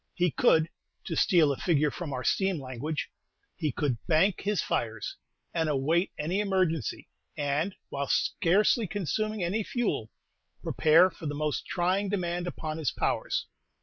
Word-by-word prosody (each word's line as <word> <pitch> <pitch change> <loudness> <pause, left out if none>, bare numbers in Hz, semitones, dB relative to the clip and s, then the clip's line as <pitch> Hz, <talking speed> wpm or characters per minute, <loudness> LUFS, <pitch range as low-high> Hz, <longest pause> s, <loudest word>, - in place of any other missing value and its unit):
He 180 -2 +2
could 160 +2 +4 0.4
to - - -4
steal 165 -6 +4
a 135 - -2
figure 150 -4 +2
from 170 -5 -5
our 130 -1 -3
steam 190 +1 +1
language 135 +4 -4 0.4
he 155 -4 -1
could 125 -3 -2
"bank 175 +4 +3
his 205 -1 0
fires," 115 -6 -2 0.4
and 160 -2 0
await 155 +6 +1
any 170 +6 -1
emergency, 185 - 0 0.3
and, 150 +6 0
while 140 0 -3
scarcely 205 +5 +2
consuming 205 +3 -2
any 190 +6 0
fuel, 205 - -1 0.5
prepare 165 +4 +5
for 160 - -7
the 145 - -3
most 150 0 -2
trying 190 +3 0
demand 175 -2 -1
upon 155 -2 -4
his 150 -7 +1
powers. - - -1
165 Hz, 150 wpm, -28 LUFS, 150-190 Hz, 0.5 s, prepare